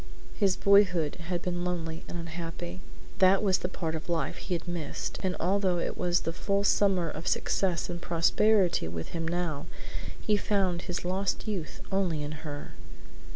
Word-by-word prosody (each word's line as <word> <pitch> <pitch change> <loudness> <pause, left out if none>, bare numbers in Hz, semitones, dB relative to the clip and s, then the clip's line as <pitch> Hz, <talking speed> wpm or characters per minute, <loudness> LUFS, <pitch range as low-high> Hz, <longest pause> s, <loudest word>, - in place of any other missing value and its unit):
His 195 -3 +2
boyhood 185 -6 +4
had 175 -1 -1
been 175 -1 -1
lonely 165 -2 -3
and 175 - -5
unhappy. 170 +1 -5 0.4
That 190 +2 +6
was 190 -2 +3
the 180 - -2
part 165 -4 -3
of 160 +3 -5
life 170 -1 0
he 180 - -2
had 170 - -5
missed, 175 -3 -4
and 185 -1 0
although 185 0 +2
it 170 - -2
was 175 0 +1
the 165 - -2
full 200 +3 0
summer 195 -4 +3
of 160 +3 -5
success 185 -2 +1
and 175 -1 -5
prosperity 180 - +3
with 80 0 -5
him 165 -1 -3
now, 165 -3 -2 0.5
he 210 -1 +2
found 190 -4 +1
his 180 0 -4
lost 190 +3 -1
youth 190 -7 -4
only 180 -6 +1
in 145 - -4
her. 145 -2 -6
175 Hz, 170 wpm, -29 LUFS, 165-190 Hz, 0.5 s, That